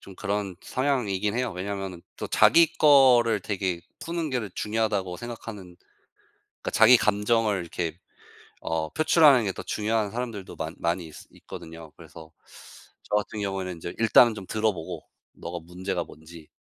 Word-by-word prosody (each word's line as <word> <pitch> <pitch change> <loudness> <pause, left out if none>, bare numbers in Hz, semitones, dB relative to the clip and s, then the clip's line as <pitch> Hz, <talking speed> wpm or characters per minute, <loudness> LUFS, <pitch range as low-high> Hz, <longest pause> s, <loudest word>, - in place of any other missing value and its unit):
좀 95 - -13
그런 100 -2 -3
성향이긴 110 -7 -1
해요. 125 -2 -1
왜냐하면은 95 -1 -5
또 - - -5
자기 165 -1 +5
거를 125 -7 +6
되게 95 -3 -2 0.2
푸는 170 -2 -3
게 130 -1 0
더 105 - -5
중요하다고 105 -4 -1
생각하는 105 -5 -9 0.9
그러니까 - - -3
자기 110 +3 +7
감정을 105 -1 +1
이렇게 85 -1 -4 0.6
어 80 -1 -2
표출하는 150 - +5
게 100 - 0
더 - - -8
중요한 105 -1 -1
사람들도 115 -5 -5
많 80 +1 -5
많이 85 0 -1
있으 80 - -13
있거든요. 80 -2 -11
그래서 80 -1 -13 0.7
저 - - -2
같은 105 0 -4
경우에는 95 -2 -3
인제 85 +1 -7
일단 115 0 +5
좀 100 - -8
들어보고 105 -7 -2 0.3
너가 85 +1 -7
문제가 90 +2 -4
뭔지 80 +1 -14
100 Hz, 345 characters per minute, -26 LUFS, 90-115 Hz, 0.9 s, 자기